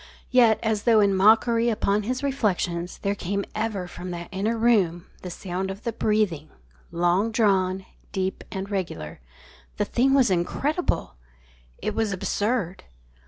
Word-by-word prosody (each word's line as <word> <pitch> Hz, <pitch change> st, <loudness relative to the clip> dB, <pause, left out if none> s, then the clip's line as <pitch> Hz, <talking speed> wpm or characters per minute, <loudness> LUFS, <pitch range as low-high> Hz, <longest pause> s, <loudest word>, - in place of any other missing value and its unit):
_ -, -, -18 dB, 0.3 s
Yet, 235 Hz, -4 st, +5 dB
as 220 Hz, -2 st, 0 dB
though 230 Hz, -3 st, +5 dB
in 200 Hz, -1 st, +4 dB
mockery 225 Hz, +4 st, +4 dB
upon 210 Hz, -2 st, +1 dB
his 255 Hz, +6 st, -3 dB
reflections, 185 Hz, -10 st, -1 dB
there 200 Hz, 0 st, +1 dB
came 200 Hz, 0 st, -3 dB
ever 215 Hz, -4 st, -2 dB
from 180 Hz, +1 st, -8 dB
that 175 Hz, -1 st, -6 dB
inner 210 Hz, +5 st, -1 dB
room 195 Hz, -7 st, +2 dB, 0.2 s
the 180 Hz, -, -6 dB
sound 185 Hz, +1 st, -4 dB
of 195 Hz, +3 st, -7 dB
the 235 Hz, -, -2 dB
breathing, 200 Hz, -8 st, 0 dB, 0.4 s
long 175 Hz, +6 st, +1 dB
drawn, 190 Hz, -4 st, +1 dB, 0.3 s
deep, 190 Hz, 0 st, -2 dB
and 190 Hz, 0 st, -4 dB
regular. 180 Hz, -, -4 dB, 0.6 s
The 210 Hz, -, +1 dB
thing 265 Hz, +6 st, +2 dB
was 260 Hz, -7 st, +4 dB
incredible. 185 Hz, -, -1 dB, 0.7 s
It -, -, -1 dB
was 220 Hz, -3 st, 0 dB
absurd. 200 Hz, 0 st, -1 dB
200 Hz, 150 wpm, -25 LUFS, 185-225 Hz, 0.7 s, Yet